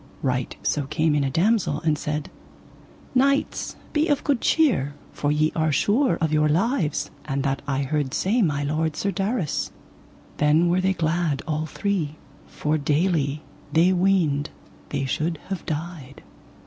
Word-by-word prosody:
Right 125 -2 -1
so 145 -3 0
came 155 +1 +1
in 145 -1 +2
a 135 - 0
damosel 180 - +2
and 155 -2 +2
said: 150 0 -3 0.8
Knights, 275 +2 +1 0.2
be 310 +1 +2
of 290 -4 +1
good 275 -5 +1
cheer, 185 - +2 0.2
for 145 - 0
ye 155 +1 +2
are 160 -1 +1
sure 215 - +2
of 160 -2 -1
your 150 0 +3
lives, 175 - 0
and 140 -2 -2
that 135 -1 -1
I 140 0 0
heard 145 -1 -1
say 225 +6 +2
my 145 -6 +1
lord, 155 +2 -1
Sir 200 +6 -1
Darras. 195 - -1 0.7
Then 155 +4 +4
were 180 +2 +2
they 190 +1 +2
glad 165 -3 0
all 155 0 -1
three, 165 -3 -2 0.3
for 155 +1 -1
daily 150 -1 +1 0.3
they 170 +4 +4
weened 175 -6 +2 0.4
they 140 -2 -1
should 155 +5 -1
have 190 -3 -3
died. 155 -3 -5
155 Hz, 155 wpm, -24 LUFS, 145-185 Hz, 0.8 s, Then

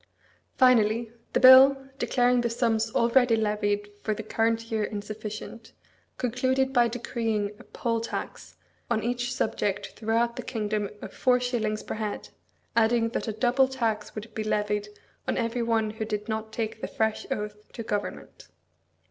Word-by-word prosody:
Finally, 230 -2 +4 0.2
the - - +3
bill, 260 +1 +9 0.2
declaring 245 -1 +2
the 235 - 0
sums 230 -1 +1
already 235 0 +4
levied 210 -1 0
for 215 - -1
the 220 - -6
current 225 +1 0
year 220 -1 0
insufficient, 215 +2 -6 0.4
concluded 260 +2 0
by 240 -2 +5
decreeing 225 -3 -2
a - - -12
poll 230 -2 -2
tax 230 - -6 0.3
on 225 -2 0
each 245 +1 -1
subject 205 -4 -1
throughout 230 +2 0
the - - -2
kingdom 210 -4 -2
of - - -8
four 250 -1 +3
shillings 225 -4 -1
per - - -5
head, 215 -1 -4 0.5
adding 230 0 +3
that 235 - -3
a - - 0
double 250 +4 +3
tax 230 -5 -2
would 215 +1 -7
be 215 - -3
levied 210 -1 -1 0.4
on - - 0
every 235 0 -1
one 225 -2 +1
who 220 0 -5
did 210 -1 -3
not 220 0 -3
take 220 -1 -4
the - - -3
fresh 220 -1 -1
oath 210 0 -5
to 230 - -6
Government. 205 -2 -5
225 Hz, 155 wpm, -27 LUFS, 215-240 Hz, 0.5 s, bill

